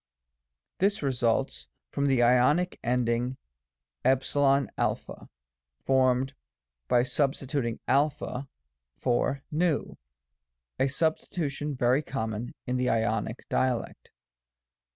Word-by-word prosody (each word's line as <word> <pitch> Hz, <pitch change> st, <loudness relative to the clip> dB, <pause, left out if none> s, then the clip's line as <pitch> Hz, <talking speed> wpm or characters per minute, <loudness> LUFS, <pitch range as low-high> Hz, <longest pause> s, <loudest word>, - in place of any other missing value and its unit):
This 200 Hz, -2 st, +1 dB
results 120 Hz, -, 0 dB, 0.2 s
from 140 Hz, 0 st, 0 dB
the 130 Hz, -3 st, +3 dB
Ionic 125 Hz, +9 st, +3 dB
ending 120 Hz, +1 st, 0 dB, 0.6 s
say 135 Hz, -, +3 dB, 1.2 s
formed 130 Hz, 0 st, +2 dB, 0.5 s
by 120 Hz, -, +4 dB
substituting 130 Hz, -2 st, -1 dB
a 140 Hz, +3 st, +4 dB, 0.9 s
for 135 Hz, +2 st, 0 dB
v, 160 Hz, -1 st, +1 dB, 1.0 s
a 135 Hz, -, +3 dB
substitution 150 Hz, 0 st, -1 dB
very 125 Hz, +2 st, +3 dB
common 115 Hz, -5 st, -4 dB
in 125 Hz, 0 st, -1 dB
the 125 Hz, 0 st, +1 dB
Ionic 110 Hz, 0 st, -1 dB
dialect. 125 Hz, -3 st, -1 dB
130 Hz, 85 wpm, -28 LUFS, 120-140 Hz, 1.2 s, by